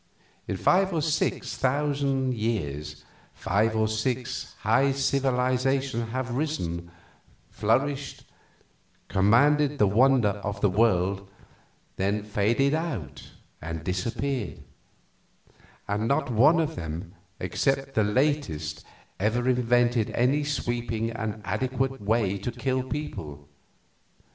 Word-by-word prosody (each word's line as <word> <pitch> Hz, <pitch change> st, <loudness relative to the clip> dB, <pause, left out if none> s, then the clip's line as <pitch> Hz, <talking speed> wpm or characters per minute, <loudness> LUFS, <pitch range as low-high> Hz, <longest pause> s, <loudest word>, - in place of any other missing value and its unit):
In -, -, -2 dB
five 190 Hz, +1 st, +3 dB
or 160 Hz, -, +1 dB
six 160 Hz, 0 st, -1 dB
thousand 135 Hz, -1 st, 0 dB
years 75 Hz, -, -3 dB, 0.3 s
five 110 Hz, +3 st, +1 dB
or 110 Hz, 0 st, +2 dB
six 120 Hz, +3 st, -2 dB
high 130 Hz, +6 st, +3 dB
civilizations 130 Hz, -2 st, 0 dB
have 130 Hz, +1 st, -3 dB
risen, 90 Hz, -, -2 dB, 0.6 s
flourished, 135 Hz, +7 st, 0 dB, 0.9 s
commanded 140 Hz, +10 st, +4 dB
the 105 Hz, -, +4 dB
wonder 120 Hz, +2 st, +4 dB
of 100 Hz, -1 st, -4 dB
the 100 Hz, -, +2 dB
world, 100 Hz, -2 st, +1 dB, 0.7 s
then 100 Hz, +2 st, 0 dB
faded 110 Hz, +7 st, +1 dB
out 155 Hz, -, -4 dB, 0.3 s
and 80 Hz, 0 st, -5 dB
disappeared; 110 Hz, +6 st, -2 dB, 1.2 s
and 105 Hz, +2 st, -1 dB
not 140 Hz, 0 st, +1 dB
one 140 Hz, +9 st, +5 dB
of 160 Hz, 0 st, -1 dB
them 80 Hz, +2 st, -6 dB, 0.3 s
except 135 Hz, 0 st, -1 dB
the 110 Hz, -, +3 dB
latest 105 Hz, -, 0 dB, 0.4 s
ever 115 Hz, +5 st, +1 dB
invented 120 Hz, -2 st, +2 dB
any 135 Hz, +5 st, +2 dB
sweeping 120 Hz, -5 st, -2 dB
and 110 Hz, -2 st, -4 dB
adequate 130 Hz, +6 st, -1 dB
way 100 Hz, -2 st, +1 dB
to 110 Hz, +6 st, -3 dB
kill 130 Hz, +2 st, -1 dB
people. 80 Hz, -, -6 dB
120 Hz, 105 wpm, -26 LUFS, 100-135 Hz, 1.2 s, one